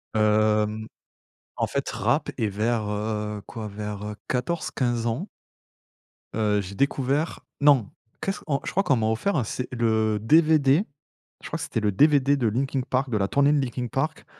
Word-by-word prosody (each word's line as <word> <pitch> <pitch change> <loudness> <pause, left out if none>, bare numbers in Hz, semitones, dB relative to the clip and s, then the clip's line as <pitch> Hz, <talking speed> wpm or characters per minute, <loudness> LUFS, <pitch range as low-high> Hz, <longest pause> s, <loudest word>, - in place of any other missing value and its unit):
Hem, 110 0 +2 0.7
en - - 0
fait, - - -2
rap - - 0
et 110 - +1
vers, 110 +2 -1
heu, 105 0 -3
quoi, 110 -2 -6
vers, 105 0 -6
heu, 105 0 -5
14-15 125 -4 -1
ans 135 - -2 1.1
heu, 105 -2 +2
j'ai 100 0 -8
découvert 140 - 0 0.2
non, 140 -8 +5 0.3
qu'est-ce 195 - -2
on 140 -3 +1
je - - -3
crois 195 - +1
qu'on 155 -8 +3
m'a 110 -1 +1
offert 110 - 0
un 135 - +2
C 125 +4 -4
le 110 -3 +1
DVD, 155 - +4 0.6
je - - -8
crois - - -3
que - - -5
c'était - - -2
le 105 -1 +1
DVD 140 +4 +4
de 125 - -1
Linkin 130 +4 0
Park, 130 +1 0
de 110 - 0
la 100 -1 +1
tournée 140 +4 +3
de 150 - +3
Linkin 125 -1 -2
Park, 155 +6 -2
120 Hz, 175 wpm, -25 LUFS, 105-140 Hz, 1.1 s, non